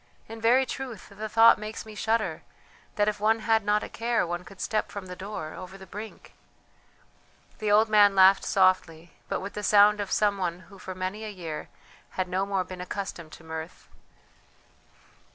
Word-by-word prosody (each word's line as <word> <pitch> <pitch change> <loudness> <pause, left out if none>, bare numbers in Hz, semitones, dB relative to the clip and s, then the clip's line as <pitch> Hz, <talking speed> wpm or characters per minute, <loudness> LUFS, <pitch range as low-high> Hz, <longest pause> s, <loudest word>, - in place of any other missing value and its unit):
In 225 0 -9
very 250 +4 +4
truth 255 -7 -7
the 215 +2 -7
thought 225 +2 +6
makes 215 +1 -6
me 215 - -10
shudder, 220 +1 -1 0.5
that 205 0 +2
if 210 -1 -1
one 220 +2 +2
had 220 -1 +2
not 210 +1 +1
a - - -5
care 230 -2 -1
one 175 +1 -4
could 195 0 -14
step 215 - -1
from 200 -2 -7
the 180 0 -8
door 185 -5 -6
over 185 +1 -9
the 190 - -12
brink!" 210 +4 -10 1.3
The 215 -1 -1
old 215 +2 +5
man 205 -2 +5
laughed 190 +1 +6
softly, 180 -3 +1 0.2
but - - -2
with 200 +1 -6
the 210 - -5
sound 210 0 +5
of 200 - -5
some 205 -2 +2
one 175 -1 -2
who 195 +1 -16
for 185 0 -7
many 185 +4 -4
a 215 - -5
year 170 -6 -7 0.5
had 185 -1 0
no 190 +2 -1
more 195 -2 0
been 180 0 -9
accustomed 180 -3 -6
to - - -13
mirth. 160 +1 -8
200 Hz, 190 wpm, -27 LUFS, 185-215 Hz, 1.3 s, thought